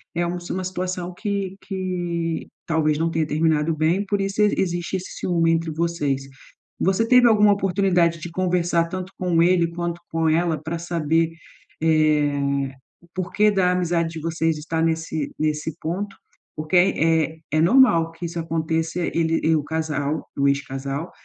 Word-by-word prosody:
é 175 - +1
um 175 +1 -2
s 175 0 -9
uma 185 - -3
situação 180 -1 -4
que 195 -1 -3
que 175 -4 -3 0.2
talvez 155 -2 +1
não 165 +1 0
tenha 160 -2 0
terminado 155 0 +1
bem, 165 +6 +1
por 200 0 -1
isso 195 +2 -1
exi 210 -1 +3
existe 175 0 -2
esse 185 - -8
ciúme 165 -2 +2
entre 165 -1 0
vocês. 155 -4 -1 0.6
Você 195 +5 +1
teve 250 0 +6
alguma 210 -2 +5
oportunidade 180 -4 +1
de 170 +2 -6
conversar 175 -2 +1
tanto 185 +1 -6
com 175 -3 +1
ele 175 -1 +4
quanto 170 0 -4
com 165 0 +1
ela 160 -1 +1
pra 160 +2 -4
saber, 165 -1 0 0.5
eh, 155 -2 +3 0.7
o 175 - -21
porquê 205 +3 +1
da 185 -2 +2
amizade 170 -2 0
de 165 - -7
vocês 165 -1 0
estar 160 +1 -2
nesse 160 -2 -1
nesse 155 +1 -1
ponto? 195 +5 -4 0.4
Porque 155 +4 -3
é 165 -3 +3
é - - -23
é 155 +1 +2
normal 170 -5 +5
que 165 +1 -7
isso 170 0 -4
aconteça, 160 +1 -2
ele 165 -1 0
e 160 +1 +3
o 150 - 0
casal, 155 -1 -2
o 140 - +3
ex-casal, 140 +2 -2
165 Hz, 165 wpm, -23 LUFS, 160-180 Hz, 0.7 s, teve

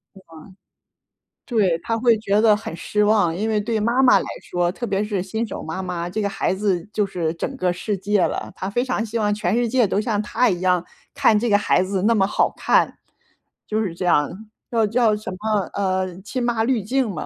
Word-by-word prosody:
是 - - -13
吗？ 165 - -17 1.1
对， 200 -9 +2
她 225 - -1
会 230 -1 +3
觉 205 -1 +1
得 215 -2 +5
很 210 -6 -6
失 210 +5 0
望， 205 -6 +3
因 215 +4 -2
为 215 -1 +1
对 220 +1 -1
妈 235 +5 +2
妈 250 - +6
来 - - -4 0.2
说， 175 0 -1
特 240 +5 -5
别 200 -1 0
是 205 -3 -2
新 220 +4 -3
手 - - -6
妈 160 +4 -4
妈， 175 -1 -4
这 215 +4 -3
个 200 - 0
孩 195 -1 -1
子 190 -2 -1
就 210 - +1
是 170 -4 -2
整 - - -4
个 180 -1 +1
世 195 +3 -3
界 200 +1 +1
了， - - -1
她 190 - -4
非 240 +4 0
常 255 -4 -1
希 230 +2 -4
望 210 -1 +1
全 205 -1 -1
世 240 0 +1
界 240 -2 +2
都 200 - 0
像 215 -2 -1
她 230 +3 +1
一 175 -2 -1
样 180 -1 +2 0.3
看 275 -7 +4
这 235 +2 0
个 205 - +5
孩 195 -3 +2
子 190 0 -2
那 230 +3 +4
么 195 -3 +3
好 - - +1
看， - - +2 0.7
就 215 +1 0
是 185 -6 -2
这 180 - -4
样， 150 -4 +3 0.4
叫 225 -2 +2
叫 225 -1 +2
什 210 -2 -6
么， 210 +2 -1
呃， 185 -2 -2
亲 240 +5 -4
妈 235 -2 +1
滤 235 -3 0
镜 250 +2 0
嘛。 190 - -5
210 Hz, 245 characters per minute, -22 LUFS, 185-225 Hz, 1.1 s, 妈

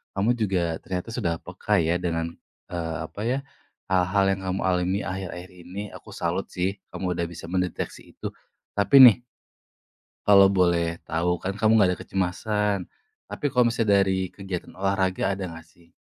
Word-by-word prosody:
kamu 110 +5 +2
juga 90 -6 0
ternyata 90 +5 -5
sudah 85 -7 -1
peka - - -2
ya 85 +2 +1
dengan 85 -2 -2 0.4
eee, 85 -2 -3 0.2
apa 100 - -7
ya, 130 +3 +1 0.5
hal-hal 95 +2 +3
yang 95 - -5
kamu 95 +1 -1
alami 90 +1 +1
akhir-akhir 95 -1 -5
ini. 90 +2 -8
Aku - - -11
salut - - -2
sih, 95 +2 -2 0.2
kamu 90 -1 -2
udah 85 -1 -1
bisa 85 0 -10
mendeteksi 90 -1 -3
itu. - - -5 0.4
Tapi 130 +7 +7
nih 125 -1 +8 1.1
kalau 100 -1 +7
boleh 85 -3 +2
tahu, 85 +2 0
kan 95 +3 -3
kamu 110 +1 +3
nggak 100 -3 +5
ada - - -15
kecemasan, 100 +2 0 0.5
tapi - - -2
kalau 125 -4 +3
misalnya 115 -3 +2
dari 95 -1 0
kegiatan 95 -1 -7
olahraga, 95 0 0
ada 95 - -3
nggak 85 - -10
sih? 85 +1 -24
95 Hz, 160 wpm, -25 LUFS, 90-100 Hz, 1.1 s, nih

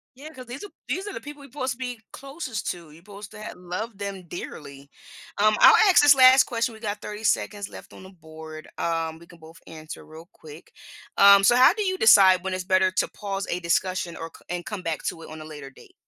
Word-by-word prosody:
Yeah, 295 +4 -11
'cause 255 -3 -12
these 255 +8 -8
are 410 - -9 0.2
these 385 +3 -3
are 405 - -6
the - - -7
people 295 0 -11
we're 275 - -14
'posed 260 -1 -3
to - - -17
be 250 -3 -6
closest 275 - -6
to, 170 -3 -11
you're 165 +3 -17
'posed 205 0 -12
to 215 -1 -12
have - - -8
loved 190 +4 -7
them 195 -3 -6
dearly. 140 -4 -9 0.5
Um, 215 +1 +3
I'll - - +8 0.2
ask - - +6
this 290 -1 +7
last 260 0 +7
question, 230 -1 -2
we 220 - -13
got 210 -1 -5
30 210 +1 -8
seconds 205 -2 -1
left - - -13
on - - -13
the 190 - -12
board, 160 -2 -12
um, 165 -1 -2
we 170 - -17
can 170 - -17
both 160 +1 -15
answer 155 -1 -10
real 160 +2 -13
quick. 155 +1 -14 0.5
Um, 200 0 +7
so 240 +5 +5
how 255 +8 +6
do 425 -1 -3
you 375 -1 -1
decide 190 -4 +6
when 190 -1 -3
it's 185 - -4
better 185 0 +2
to - - 0
pause 200 -1 -5
a 175 - -2
discussion, 180 0 -1
or 165 0 -8
c - - -18
and 175 -1 -4
come 210 -4 -6
back 165 -3 -4
to 165 - -4
it - - -11
on 155 0 -9
a - - -10
later 145 -3 -10
date? 135 - -19
195 Hz, 245 wpm, -24 LUFS, 165-235 Hz, 0.5 s, I'll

